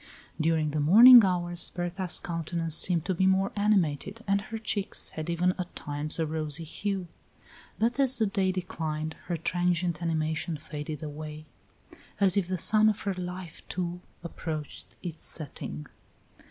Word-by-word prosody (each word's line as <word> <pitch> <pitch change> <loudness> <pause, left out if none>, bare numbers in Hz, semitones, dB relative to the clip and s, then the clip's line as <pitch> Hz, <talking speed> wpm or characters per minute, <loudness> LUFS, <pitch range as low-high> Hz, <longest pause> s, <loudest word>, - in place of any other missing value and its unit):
During 155 -1 +1
the 155 - -2
morning 230 - +9
hours 175 -2 +1
Berta's 180 +1 -3
countenance 165 -1 -2
seemed 170 -2 +6
to 190 - 0
be 190 +2 +1
more 190 +1 +2
animated, 205 0 0
and 200 0 +2
her 225 +2 -7
cheeks 210 -2 -1
had 155 +1 -6
even 175 +2 +1
at 180 -1 -6
times 150 0 -2
a 165 - 0
rosy 155 0 -2
hue; 190 +3 -4 0.7
but 235 +4 0
as 265 -2 +4
the 225 - +2
day 195 -2 0
declined 160 -4 -4
her 175 - -2
transient 175 +1 -1
animation 160 0 -2
faded 150 0 -7
away, 155 0 -7 0.7
as 195 -3 +5
if 195 -4 +1
the 185 0 -2
sun 215 +5 +4
of 210 - -2
her 200 - -2
life 180 -2 -7
too 180 0 -4 0.2
approached 160 -3 -7
its 170 -3 -7
setting. 100 - -4
175 Hz, 155 wpm, -28 LUFS, 155-190 Hz, 0.7 s, morning